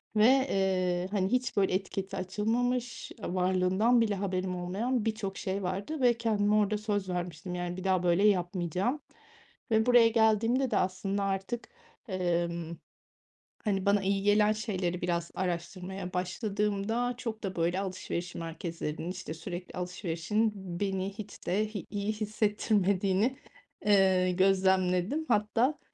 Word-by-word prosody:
ve, 215 0 +5
eee, 190 -8 +2
hani, 195 -1 0
hiç, 250 -2 0
böyle, 195 -2 +3
etiketi 195 0 -3
açılmamış, 235 +6 -1
ııı, 180 - -3
varlığından 185 +6 +3
bile 215 -3 +1
haberim 185 -1 -2
olmayan 210 +7 -1
birçok 215 -3 -2
şey 195 +1 -3
vardı 200 +12 -3
ve 245 -1 +5
kendime 210 -3 +2
orada 210 0 +2
söz 205 -3 -2
vermiştim, 180 0 -4
yani, 175 0 -3
bir 185 - -6
daha 190 -2 +2
böyle 175 +3 +3
yapmayacağım 185 - 0 0.7
ve 220 +1 +3
buraya 245 -2 +7
geldiğimde 225 +3 +3
de - - +1
aslında 195 +2 0
artık, 195 +5 -3 0.4
emm, 170 -3 -1 0.9
hani, 195 -3 0
bana 200 0 +4
iyi 195 0 0
gelen 210 +1 +4
şeyleri 190 -5 -2
biraz 170 -1 -1
araştırmaya 180 +1 -4
başladığımda 210 +5 -1
çok 225 -3 -5
da, 190 -2 -3
böyle, 170 +2 +1
alışveriş 185 -2 -4
merkezlerinin, 165 0 -4
işte, 185 -4 -6
sürekli 175 +3 -7
alışverişin 180 +4 -1 0.3
beni 195 -1 -1
hiç 210 0 -10
de 210 +4 +1
hi 200 - -4
iyi 205 +1 -2
hissettirmediğini 210 +1 +1 0.5
eee, 190 -3 +4
gözlemledim. 190 - +2
Hatta, 235 +6 +2
195 Hz, 130 wpm, -30 LUFS, 180-215 Hz, 0.9 s, buraya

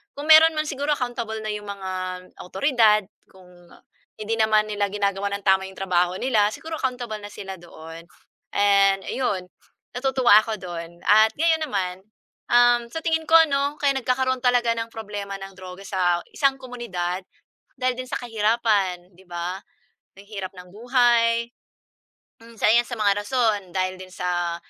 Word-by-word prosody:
kung 295 +2 0
meron 320 +1 +8
man, 305 - +1
siguro 290 0 -1
accountable 235 -3 -4
na 215 - -2
'yong 210 0 -7
mga 195 -2 -6 0.5
awtoridad 215 0 +2 0.2
kung 180 -2 -19 0.5
hindi 215 +1 -3
naman 215 -1 +3
nila 205 -1 -1
ginagawa 200 0 -1
nang 200 0 -5
tama 190 -1 +3
'yong 190 - -16
trabaho 180 -1 0
nila, 215 -4 +2
siguro 320 +8 -7
accountable 245 -5 -3
na 205 - -8
sila 195 -2 -8
doon 165 0 -12 0.5
and 195 -1 +4
ayun, 205 -8 -1 0.5
natutuwa 255 -3 +4
ako 220 0 -3
dun 170 -3 -8
at 215 +1 +5
ngayon 320 +1 +2
naman, 185 -7 -2 0.5
um, 240 0 +4
sa 325 +6 -6
tingin 320 -1 0
ko 325 - +5 0.2
‘no, 280 +1 0
kaya 285 -2 +2
nagkakaroon 260 0 0
talaga 245 -2 +2
ng 230 0 -4
problema 205 -3 -6
ng 195 0 -9
droga 185 +1 -10
sa 180 -3 0
isang 275 -1 +2
komunidad 230 -9 -4 0.6
dahil 255 -1 0
din 255 +1 -7
sa - - -2
kahirapan, 210 -6 0
‘di 185 - -19
ba. 175 +2 -4 0.6
Ang 200 +1 -15
hirap 195 -3 -6
ng 180 0 -12
buhay. 235 +1 +2 0.9
Mm, 230 0 -15
isa - - +3
‘yan 240 +1 +3
sa 240 - -5
mga 205 -1 +2
rason 225 -4 +1
dahil 185 0 -1
din 185 - -9
sa 175 -2 -2
215 Hz, 160 wpm, -23 LUFS, 190-245 Hz, 0.9 s, meron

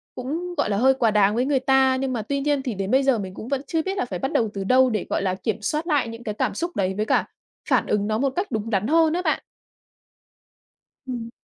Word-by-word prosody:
cũng, 330 +8 -4
gọi 290 - +1
là, 200 - 0
hơi 260 +5 +5
quá 240 -4 +2
đáng 210 0 +3
với 245 +2 +1
người 275 -1 +2
ta. 265 0 +3
Nhưng 260 0 -2
mà 235 - -2
tuy 280 +6 -2
nhiên 290 0 +1
thì 250 -4 -2
đến 195 0 -3
bây 265 +2 +4
giờ 270 -3 +3
mình 190 -2 -6
cũng 215 - -8
vẫn 275 0 -1
chưa 325 -2 0
biết 385 +4 -3
là - - 0
phải 185 -7 -5
bắt 270 - -2
đầu 225 -2 +1
từ 195 - -3
đâu 255 +5 +4
để, 215 -5 -2
gọi - - 0
là, 185 -1 0
kiểm 215 +2 -3
soát 305 +10 -2
lại 295 -7 +2
những 230 +1 -8
cái 215 - -3
cảm - - -1
xúc 345 +1 -3
đấy 190 -1 0
với 215 - 0
cả - - +2 0.4
phản - - +2
ứng 205 -1 0
nó 215 0 0
một 275 +4 +1
cách 370 -1 -2
đúng 220 -1 -2
đắn 205 -1 0
hơn 320 +2 +4
á 355 - 0
bạn. - - +1 1.7
Ừm. 240 -3 -5
255 Hz, 275 wpm, -23 LUFS, 215-280 Hz, 1.7 s, hơi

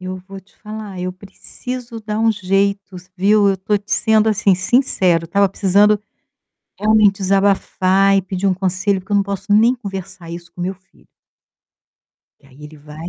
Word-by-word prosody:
eu 185 0 -6
vou 195 0 -10
te 190 +1 -30
falar, 210 -3 -8
eu 185 0 -3
preciso 230 +5 -8
dar 210 0 -4
um 225 0 +3
jeito 195 0 -1
s 180 0 -13
viu. 205 +2 +3
Eu 195 - +1
tô 205 +3 -1
te 205 +1 -8
sendo 220 +1 +3
assim, 210 -2 +2
sincero, 185 -5 +2
eu - - -9
estava 200 +4 +2
precisando 205 +2 +2 0.8
realmente 210 -2 +3
desabafar 195 0 +2
e 195 - +1
pedir 190 +1 -3
um 190 - +1
conselho, 190 +2 0
porque 190 +3 -10
eu - - +4
não 200 - +3
posso 200 +1 -4
nem 225 +4 +5
conversar 195 -6 -8
isso 170 0 -9
com 175 - -11
meu 185 +2 -2
filho. 190 +1 -28 1.3
E - - -23
aí 140 +2 -15
ele 150 +1 -12
vai 150 +3 -10
195 Hz, 185 wpm, -18 LUFS, 185-210 Hz, 1.3 s, nem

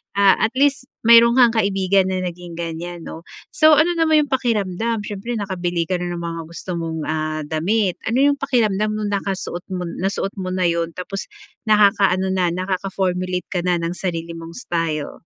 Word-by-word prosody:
ah, 200 -1 +5
at 220 - +2
least 280 0 +2 0.2
mayroon 235 +1 +7
kang 245 -3 +6
kaibigan 195 -2 +2
na 185 -1 -2
naging 175 -1 -6
ganyan, 170 +1 -5
'no? 165 - -9 0.3
So 310 -1 +6
ano 315 +4 +4
naman 315 -2 +4
'yong 280 - -20
pakiramdam, 225 -3 0
siyempre, 210 +3 -5
nakabili 180 -5 -2
ka 185 -1 0
na 180 - -3
ng 170 - -5
mga 165 0 -4
gusto 170 +2 -8
mong, 165 -1 -4
ah, 155 0 -2
damit? 180 +6 0
Ano 245 +4 +2
'yong 285 0 +3
pakiramdam 215 -6 +1
no'ng 210 -1 -2
nakasuot 195 -3 -3
mo 180 - -3 0.2
nasuot 195 +1 -1
mo 185 -1 -3
na 185 - 0
'yon, 170 -1 -2
tapos, 195 +2 -5 0.4
nakaka-ano 200 -3 +4
na, 185 -1 +1
nakaka-formulate 185 -1 -2
ka 180 - 0
na 180 -1 +2
ng 165 0 -2
sarili 170 -3 -3
mong 165 0 -9
style? 165 - -3
190 Hz, 175 wpm, -21 LUFS, 175-215 Hz, 0.4 s, mayroon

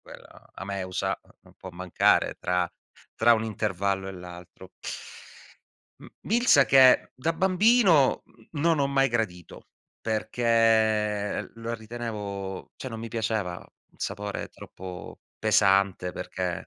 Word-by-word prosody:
Quella - - -15
"A 95 - -7
Meusa" 95 -2 -3
no - - -24
non - - -20
può - - -10
mancare 90 0 +1
tra 90 0 0 0.5
tra 120 +1 +5
un 110 - -2
intervallo 100 -3 -2
e - - -6
l'altro. 90 0 -11 1.3
M - - -12 0.2
milza 225 - +4
che 130 -2 +6
da 160 +6 -1
bambino 190 - +4 0.3
non 160 +1 +1
ho 140 - +2
mai 135 -1 +2
gradito, 110 -8 -4 0.3
perché 110 -2 +1
lo 115 0 -5
ritenevo, 105 -4 -6
cioè 130 - -6
non 115 -3 -7
mi 115 - -6
piaceva, 110 -5 -2
un - - -23
sapore 100 +1 -4
troppo 90 -2 -10 0.2
pesante 95 -2 +2
perché 90 0 -4
110 Hz, 120 wpm, -26 LUFS, 95-120 Hz, 1.3 s, che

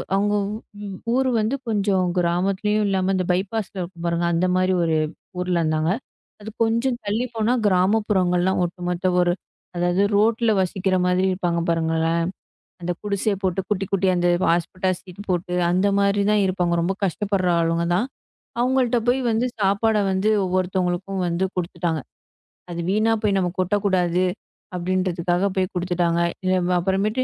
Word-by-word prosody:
அவுங்க 205 +1 +1 0.5
வ் 195 -2 -6 0.2
ஊரு 260 +1 +2
வந்து 220 +5 0
கொஞ்சம் 200 -4 +1
கிராமத்துலயும் 195 +4 +1
இல்லாம 190 -1 +1
அந்த 185 -1 0
பைபாஸ் 195 +3 -1
ல - - -10
இருக்கும் 170 -1 -7
பாருங்க. 170 0 0
அந்தமாரி 185 +2 +2
ஒரு 160 -1 +1 0.4
ஊர்ல 180 -1 0
இருந்தாங்க. 155 +2 +1 0.5
அது 215 - -7
கொஞ்சம் 230 +2 +1
தள்ளிப் 230 +4 -2
போனா 225 +2 +1
கிராமப்புறங்கள்லாம் 185 -2 +2
ஒட்டுமொத்த 180 +1 -3
ஒரு 175 0 +3 0.4
அதாவது 175 +3 +1
ரோட்டுல 225 +2 +3
வசிக்கிற 185 +1 0
மாதிரி 180 +1 +2
இருப்பாங்க 175 -2 -1
பாருங்களேன். 165 0 +1 0.6
அந்தக் 175 0 -4
குடிசைய 205 0 0
போட்டு 190 0 0
குட்டி, 200 -2 0
குட்டியா 190 -1 +2
அந்த 175 0 +2 0.2
ஹாஸ்பெட்டாஸ் 185 +2 0
ஷீட் 190 +3 -11
போட்டு, 180 0 -1 0.2
அந்தமாரி 200 +2 +2
தான் 210 - +3
இருப்பாங்க. 180 -2 0
ரொம்ப 185 +3 0
கஷ்டப்படுற 195 +1 0
ஆளுங்க 165 +1 +1
தான். 210 +8 +1 0.5
அவுங்கள்ட்ட 250 -1 +2
போய் 255 +2 +3
வந்து 225 +3 +1
சாப்பாட 205 +3 +2
வந்து 190 +3 +1 0.2
ஒவ்வொருத்தவங்களுக்கும் 185 +1 -1
வந்து 170 +2 0
குடுத்துட்டாங்க. 170 -2 -2 0.7
அது 170 - -5
வீணா 215 +3 +2
போய் 200 -2 +2
நாம 180 -2 0
கொட்ட 185 +2 +1
கூடாது 180 -2 +2 0.5
அப்பிடின்றதக்காக 180 0 0
போய் 185 -1 0
குடுத்துட்டாங்க. 175 -1 0 0.2
இத 185 - +2 0.3
அப்பறமேட்டு 200 +7 0
185 Hz, 140 wpm, -22 LUFS, 175-205 Hz, 0.7 s, ஒரு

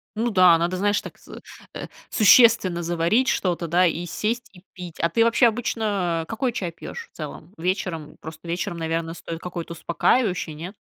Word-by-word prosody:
Ну 230 +2 -1
да, 180 -3 +6
надо, 175 +2 -1
знаешь, 205 +1 +1
так - - -11
сы - - -12 0.3
э, - - -6 0.2
существенно 215 -5 +5
заварить 175 +9 +1
что-то, 175 -2 0
да, 180 +3 +3
и 170 +1 -1
сесть, 235 +7 -3
и 180 0 -17
пить. 180 -3 -10
А 170 - +1
ты, 230 +7 +3
вообще, 230 +1 +4
обычно 205 -7 -1
какой 250 +3 -1
чай 180 -7 -3
пьёшь 460 - -9
в - - -45
целом? 180 - -8
Вечером? 165 -3 -3
Просто 160 +1 -10
вечером, 170 0 -3
наверно, 165 0 -2
стоит 165 -1 -7
какой-то 170 -1 -6
успокаивающий, 180 +1 0
нет? 180 +7 -8
180 Hz, 175 wpm, -23 LUFS, 170-215 Hz, 0.3 s, да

